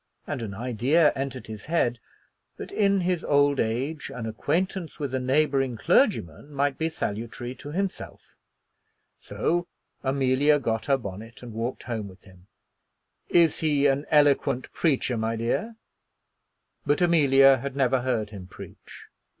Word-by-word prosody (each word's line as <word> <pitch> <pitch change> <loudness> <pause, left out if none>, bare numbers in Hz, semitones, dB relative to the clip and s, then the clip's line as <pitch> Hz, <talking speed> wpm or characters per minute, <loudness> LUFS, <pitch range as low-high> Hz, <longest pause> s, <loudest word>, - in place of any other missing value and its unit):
And - - -4
an 100 -3 -5
idea 130 +8 +2
entered 135 -1 -4
his 110 -2 -9
head 125 -7 0 0.6
that - - -8
in 200 -2 +2
his 180 -1 0
old 145 -1 +3
age 130 +7 -2
an 120 -2 -6
acquaintance 165 - -2
with 140 -5 -4
a 130 - 0
neighboring 135 -1 +1
clergyman 85 - +1
might 140 -1 -1
be 160 0 0
salutary 120 -2 -4
to 145 - -8
himself. 195 +3 -4 0.9
So 175 +1 -1 0.3
Amelia 135 +2 +2
got 115 -5 -2
her 135 -1 +3
bonnet 115 +1 -9
and 120 -2 -8
walked 115 +3 -4
home 110 -4 -4
with 95 -1 -15
him. 95 -1 -19 0.8
"Is 170 -3 +4
he 145 -3 +1
an 140 +1 +2
eloquent 140 -3 +2
preacher, 135 -6 0
my 110 +1 -1
dear?" 120 - -2 1.1
But 145 0 +1
Amelia 135 -6 +5
had 135 +2 -6
never 130 -2 +2
heard 115 -5 -1
him 95 -4 -9
preach. - - -12
135 Hz, 140 wpm, -26 LUFS, 115-150 Hz, 1.1 s, Amelia